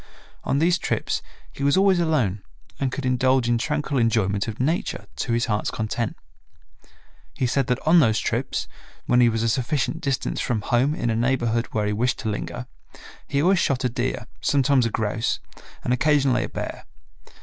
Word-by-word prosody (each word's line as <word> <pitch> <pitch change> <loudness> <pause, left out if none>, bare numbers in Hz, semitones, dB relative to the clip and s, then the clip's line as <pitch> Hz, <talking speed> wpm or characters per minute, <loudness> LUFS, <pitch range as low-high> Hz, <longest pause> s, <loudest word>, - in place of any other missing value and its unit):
On 135 - 0
these 170 +4 +3
trips - - -1 0.3
he - - -9
was 140 +5 +3
always 190 -2 +4
alone 130 - +1 0.4
and 135 -2 0
could 135 +1 -4
indulge 130 0 +2
in 120 -1 +2
tranquil 150 0 -1
enjoyment 110 -3 +1
of 110 -1 -5
Nature 155 +7 -1
to 120 - -1
his 115 0 +1
heart's 105 -2 -1
content. 110 +1 -3 1.2
He 130 - 0
said 130 +1 +1
that 125 - +1
on 165 +3 +6
those 110 -7 +3
trips, - - -2 0.4
when 125 0 +4
he 120 - +6
was 115 0 -1
a - - +2
sufficient 130 +7 0
distance 135 -4 -1
from 110 -4 -1
home 125 +8 +1
in 120 - -1
a - - 0
neighborhood 120 -1 +1
where 105 -1 -1
he 105 - 0
wished 120 +4 0
to 110 - -2
linger, 120 +4 -4 0.6
he 140 +1 0
always 185 +1 +4
shot 135 -5 +1
a 125 - +2
deer, 120 0 -2 0.2
sometimes 135 -3 +3
a - - -2
grouse, 110 +1 -1 0.4
and 125 - +1
occasionally 135 -3 +2
a - - -8
bear. - - -6
125 Hz, 180 wpm, -24 LUFS, 115-140 Hz, 1.2 s, on